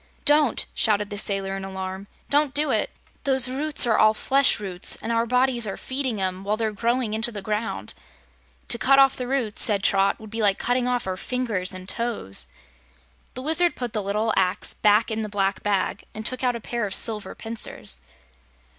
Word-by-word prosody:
"Don't!" 295 -4 +4
shouted 210 -1 +1
the 205 - -4
sailor 195 -1 0
in 195 - -5
alarm. 190 0 -6 0.2
"Don't 290 -1 +2
do 300 +1 +2
it! - - +1 0.3
Those 265 -2 +2
roots 285 +3 +2
are 225 -2 +2
all 215 0 +5
flesh 275 +2 +3
roots, 190 -3 -1
and 230 - -5
our 230 0 +1
bodies 250 -2 +1
are 195 - -4
feeding 260 -5 -2
'em 185 0 -2
while 210 +2 -1
they're 220 -1 -1
growing 235 +1 -1
into 225 +2 +1
the 205 -3 -4
ground." 215 +2 -3 0.8
"To 235 - +3
cut 275 +1 +4
off 270 -1 +6
the 250 - -5
roots," 250 -5 -1
said 205 -5 +2
Trot, 195 0 +2
"would 215 -1 -12
be 225 0 -3
like 200 -2 +3
cutting 245 0 0
off 250 -1 -1
our 185 -1 -3
fingers 225 -6 -2
and 185 -1 -7
toes." 205 - -1 0.9
The 255 - -6
Wizard 335 +4 +2
put 245 -3 -4
the 215 - -1
little 210 +3 -1
axe 185 -1 +1
back 210 +2 +3
in 220 0 -1
the 215 - -4
black 195 -1 -1
bag 200 -1 -1
and 215 0 -6
took 255 +1 -3
out 250 -1 +1
a - - -4
pair 235 -1 -3
of 195 - -4
silver 215 -3 0
pincers. 225 - -1
220 Hz, 200 wpm, -24 LUFS, 200-250 Hz, 0.9 s, off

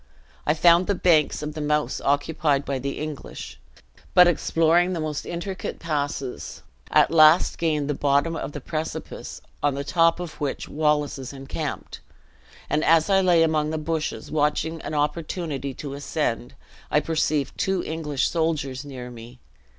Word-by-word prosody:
I 150 - +3
found 170 +2 +5
the 200 - +1
banks 160 -5 +3
of 150 0 -4
the 155 - -5
Mouse 150 0 0
occupied 145 0 +1
by 135 -2 -2
the 140 +2 -4
English; 155 -2 -7 0.6
but 180 - +9
exploring 175 +1 +2
the 170 - -3
most 155 -2 -3
intricate 175 +2 -5
passes, 145 -5 -4 0.3
at - - +4
last 160 +1 +5
gained 155 -4 0
the 145 - 0
bottom 145 +4 +1
of - - -4
the 145 - -7
precipice 155 +3 -5 0.2
on 145 -2 +1
the 140 - -3
top 165 +3 +3
of 160 -4 -7
which 145 -2 -3
Wallace 150 -2 0
is 130 +1 -7
encamped; 135 0 -5 0.7
and 150 +2 0
as 165 +3 +4
I 195 0 +5
lay 175 -3 +4
among 155 -1 +1
the 160 - -2
bushes, 155 0 -3
watching 155 +2 0
an 155 - -5
opportunity 150 -2 -2
to 140 -2 -6
ascend, 140 -4 -3 0.3
I 150 - +3
perceived 155 -2 -1
two 190 -2 0
English 150 -4 -1
soldiers 150 -5 -1
near 130 -3 -8
me. 120 +1 -11
150 Hz, 160 wpm, -24 LUFS, 145-165 Hz, 0.7 s, but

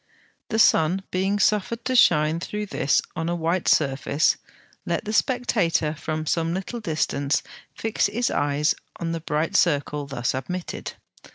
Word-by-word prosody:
The 220 - -1
sun 185 -3 +4
being 190 +2 0
suffered 210 +4 +1
to 255 0 0
shine 160 -7 +4
through 210 +4 -4
this 140 -8 +1
on 160 +1 -2
a 175 - 0
white 170 +2 -1
surface, 140 +1 +2 0.5
let - - -2
the 215 - -3
spectator 210 - +1
from 155 0 -4
some 165 +2 0
little 195 +6 -4
distance 155 -6 0 0.3
fix 225 -1 0
his 240 +2 -1
eyes 145 +2 +1 0.3
on 165 -1 -2
the 165 -1 -3
bright 155 0 -1
circle 145 -3 +1
thus 130 -3 -2
admitted. 175 +7 -5
165 Hz, 150 wpm, -24 LUFS, 150-205 Hz, 0.5 s, sun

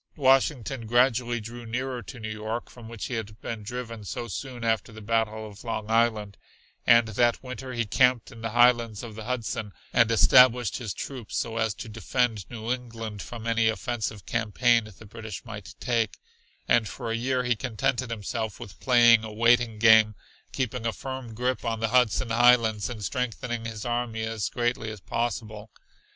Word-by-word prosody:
Washington 135 -3 +2
gradually 120 0 +2
drew 120 +2 -8
nearer 125 +2 -3
to 125 +1 -10
New 110 -1 -5
York, 110 +2 -4
from 115 -2 -12
which 115 -2 -6
he - - -5
had 110 -2 -5
been 115 -2 -5
driven 115 0 -6
so 120 +4 -5
soon 125 +2 -6
after 115 +1 0
the 110 - -10
Battle 110 0 -1
of 105 0 -12
Long 110 -2 -4
Island, 110 -3 +1 0.5
and 115 -1 +6
that 120 +3 +1
winter 130 0 -7
he 120 -1 -1
camped 125 +2 +2
in 115 - -12
the 115 - -2
highlands 120 -2 +3
of 115 -2 -7
the 110 0 -8
Hudson 115 -4 -3 0.2
and 115 -2 +5
established 125 0 +5
his 115 -6 -5
troops 130 -6 -6
so 115 -1 -2
as 110 -3 0
to - - -8
defend 110 -1 -1
New 115 +1 -2
England 115 -4 -6
from 115 -2 -8
any 115 -1 +2
offensive 110 -3 -3
campaign 115 0 +1
the 110 - -13
British 110 0 -8
might 105 -4 -9
make, 115 -4 0 0.5
and 115 -2 +3
for 120 -3 -5
a - - 0
year 125 +2 0
he 125 -1 +1
contented 120 +1 -1
himself 110 -1 -4
with 100 - -10
playing 120 -3 +6
a 110 - -6
waiting 115 0 +3
game, 110 -1 +6 0.4
keeping 125 -2 -2
a 115 - -1
firm 130 -4 -7
grip 125 +2 -1
on 115 -2 -2
the 115 0 0
Hudson 125 -1 +2
Highlands 115 -2 +4
and 110 -4 -6
strengthening 120 +1 -3
his 110 -2 -6
army 120 -2 -2
as 110 -1 -2
greatly 120 -2 -1
as 105 -1 -7
possible. 110 0 -3
115 Hz, 180 wpm, -27 LUFS, 110-120 Hz, 0.5 s, and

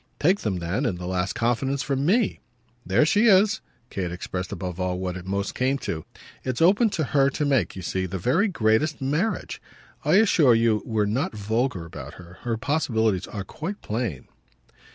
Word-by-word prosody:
Take 185 +7 +3
them 100 -4 -2
then, 90 +10 -1
in 95 - -1
the 90 0 -7
last 95 +1 -1
confidence, 130 +4 0
from 140 0 -1
ME. 220 +3 +2 0.4
There 150 - +3
she 210 +8 +4
is." 205 +1 +5 0.3
Kate 90 -3 -3
expressed 90 +1 -5
above 90 -2 -5
all 90 -1 -1
what 90 -1 -3
it 90 0 -8
most 100 +1 -2
came 130 +2 +1
to. 80 - -4 0.4
"It's 130 -2 -2
open 200 +7 +5
to 160 - +1
her 140 0 +3
to 145 +2 -2
make, 130 -11 +1
you 95 - -7
see, 95 +2 -2
the 95 +2 -4
very 130 - +2
greatest 150 - +1
marriage. 150 +11 -1 0.4
I - - +3
assure 170 - +5
you 115 -2 +2
we're 110 -2 +1
not 110 +3 -1
vulgar 110 -2 -1
about 85 - -9
her. 90 +1 -13
Her 115 -2 -2
possibilities 115 - 0
are 100 - -5
quite 185 - -6
plain." 105 - -3
115 Hz, 185 wpm, -25 LUFS, 95-150 Hz, 0.4 s, is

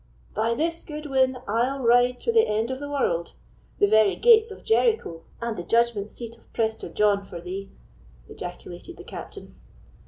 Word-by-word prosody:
"By 225 +2 0
this 330 +5 -1
good 300 0 -8
win, 260 -2 +2
I'll 250 +6 0
ride 245 +1 +4
to 465 - +1
the 450 -1 +4
end 220 +3 0
of 260 - -4
the 285 0 -6
world—the 205 -6 -2
very 215 0 +4
gates 455 -1 +6
of 405 - -11
Jericho, 445 - +1 0.2
and 235 -1 -3
the 175 - -5
judgment 230 0 +1
seat 230 0 -9
of - - -28
Prester 220 -1 -1
John, 205 -1 +2
for 180 -3 -9
thee!" 190 +3 -6 0.6
ejaculated - - -9
the - - -10
Captain. - - -9
235 Hz, 165 wpm, -25 LUFS, 205-285 Hz, 0.6 s, gates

